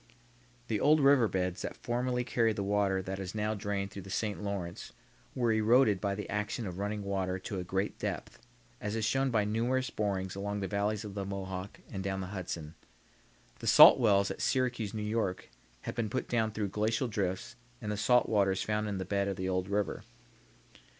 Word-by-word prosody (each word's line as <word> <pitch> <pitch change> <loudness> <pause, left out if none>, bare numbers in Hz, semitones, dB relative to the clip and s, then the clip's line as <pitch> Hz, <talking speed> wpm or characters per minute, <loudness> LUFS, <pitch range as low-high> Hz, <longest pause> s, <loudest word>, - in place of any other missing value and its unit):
The 110 -2 0
old 155 +6 +5
river 140 -4 +5
beds 90 -2 -2
that - - -5
formerly 125 +1 -1
carried 115 -2 +1
the 100 - -2
water 100 -1 +1
that 95 +1 -4
is 95 +1 -5
now 105 0 0
drained 100 -1 -3
through 100 - -7
the 95 - -11
St. 105 +1 -2
Lawrence 100 -4 -5 0.4
were 120 -3 +2
eroded 110 -1 +4
by 100 -1 0
the 105 - -5
action 105 +2 -2
of 90 -1 -5
running 105 +1 -2
water 95 -2 -1
to 95 +1 -5
a - - -3
great 95 +3 -2
depth, - - -4 0.4
as 105 +1 -2
is 110 -1 0
shown 135 +4 +2
by 110 -4 +2
numerous 120 +5 0
borings 95 -3 -2
along 100 +1 -3
the 95 - -2
valley 100 +1 0
of 105 -2 -7
the 100 -1 -3
Mohawk 95 -1 -5
and 95 -1 -4
down 95 0 -2
the 95 +1 -5
Hudson. 85 -5 -5 0.9
The - - -6
salt - - +9
wells 100 -4 +3
at - - -6
Syracuse, 120 -5 0
N. 105 +1 -2
Y., 105 -5 +1 0.5
have - - -5
been 115 -3 -2
put 130 - -2
down 115 -2 +1
through 105 -2 -2
glacial 110 +5 0
drifts 95 -4 -2 0.2
and 105 -2 -4
the - - -1
salt 125 +4 +4
water 100 -3 +3
is 95 - -2
found 105 0 -1
in 100 -2 -2
the 95 - -3
bed 100 +1 0
of 100 - -1
the 95 0 -3
old 95 0 -1
river. 100 -3 -1
105 Hz, 205 wpm, -31 LUFS, 95-110 Hz, 0.9 s, salt